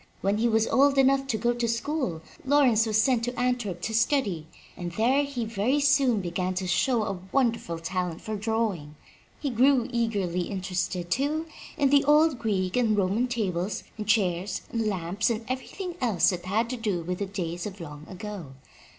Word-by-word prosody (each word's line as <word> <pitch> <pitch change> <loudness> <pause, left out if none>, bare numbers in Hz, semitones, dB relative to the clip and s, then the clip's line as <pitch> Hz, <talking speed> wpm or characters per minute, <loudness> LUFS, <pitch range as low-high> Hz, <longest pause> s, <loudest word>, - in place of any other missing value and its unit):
When 200 +2 +1
he 235 - +3
was 225 -1 +3
old 275 +2 +3
enough 270 0 +4
to 225 - 0
go 240 +3 +1
to 240 -1 -1
school 230 - -2 0.2
Lawrence 260 -5 +4
was 215 0 +2
sent 235 0 +2
to 245 0 -4
Antwerp 240 -8 -1
to 220 - -2
study, 220 - +1 0.3
and 175 -1 -5
there 250 +8 +3
he 280 -5 -3
very 225 +6 0
soon 275 -6 +3
began 185 +1 -2
to 185 +1 -2
show 225 +6 +2
a 195 -3 -3
wonderful 230 -10 0
talent 180 0 -3
for 215 - -5
drawing. 205 -8 -2 0.4
He 280 - -2
grew 255 +1 +4
eagerly 200 -7 -1
interested, 180 -2 -3
too, 300 +4 0 0.3
in 280 -1 +4
old 300 -2 +4
Greek 190 -5 -1
and 225 -4 +2
Roman 200 +6 +1
tables 195 -5 -2
and 210 -2 -6
chairs 190 -3 +1
and 225 -2 -1
lamps 190 +2 -1
and 225 -1 -2
everything 345 +8 -4
else 215 -9 +3
that 175 -1 -5
had 215 +5 +1
to 255 - -3
do 205 -6 -1
with 180 +2 -3
the 200 - -2
days 175 -2 -4
of 200 -1 -9
long 150 -2 -9
ago. 185 -6 -7
220 Hz, 180 wpm, -27 LUFS, 185-250 Hz, 0.4 s, enough